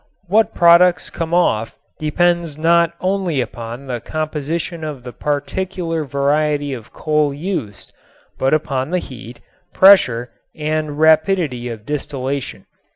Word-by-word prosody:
What 215 +5 +2
products 170 +1 +5
come 165 -1 -4
off 115 -11 +1 0.2
depends 170 0 0
not 170 +1 +3
only 185 -5 0
upon 120 +1 -5
the 125 -3 -4
composition 155 +4 -4
of 145 -5 -6
the 125 -1 -8
particular 165 +2 -3
variety 145 +1 0
of 115 -4 -9
coal 150 -2 0
used, 145 - -5 0.5
but 135 - +1
upon 135 -3 0
the 180 - 0
heat, 125 -7 -9 0.3
pressure 125 -12 +5 0.2
and 155 -1 -2
rapidity 155 -5 +2
of 110 -2 -8
distillation. 140 -1 -4
150 Hz, 120 wpm, -19 LUFS, 135-170 Hz, 0.5 s, products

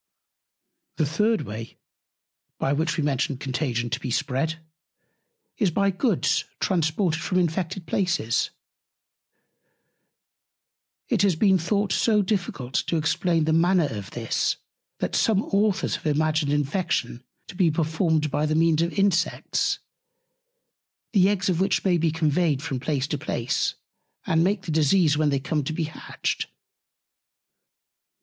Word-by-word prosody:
The 155 - +2
third 210 +9 +1
Way, 110 +2 -7 0.8
by 135 - 0
which 160 +3 0
we 155 - 0
mentioned 140 -1 -1
Contagion 125 -4 -2
to 125 - -1
be 130 - -5
spread, 140 +7 -1 1.0
is 205 -5 +3
by 200 +4 +1
Goods 195 - +1
transported 165 -1 0
from 185 - -1
infected 175 +1 -1
Places. 170 - 0 2.6
It - - +1
has 195 -4 +3
been 190 +2 +4
thought 200 +5 0
so 215 -3 +3
difficult 175 - -3
to 170 - +1
explain 165 +1 +1
the 160 +1 +1
Manner 170 -1 +3
of 100 -3 -6
this, 115 -1 -1 0.4
that - - -2
some 215 -2 +2
Authors 205 0 +1
have - - -6
imagined 155 0 +1
Infection 145 -4 -1 0.2
to - - -10
be 180 -2 +3
performed 160 -1 0
by 150 +1 0
the 155 - 0
Means 165 0 +3
of 170 +1 0
Insects, 195 -3 +1 1.4
the 195 -2 +5
Eggs 200 -2 0
of 180 -3 +1
which 195 +1 +1
may 180 -3 +3
be 165 0 +2
conveyed 155 -2 +1
from 130 - -3
Place 140 -1 -1
to 150 - -2
Place, 125 -5 -1 0.5
and 165 0 +2
make 195 +1 0
the 165 - -4
Disease 155 +1 +3
when 150 0 +2
they 140 -1 +1
come 150 +2 -1
to 160 - -2
be 165 - -1
hatched. 155 0 -4
160 Hz, 140 wpm, -25 LUFS, 145-185 Hz, 2.6 s, the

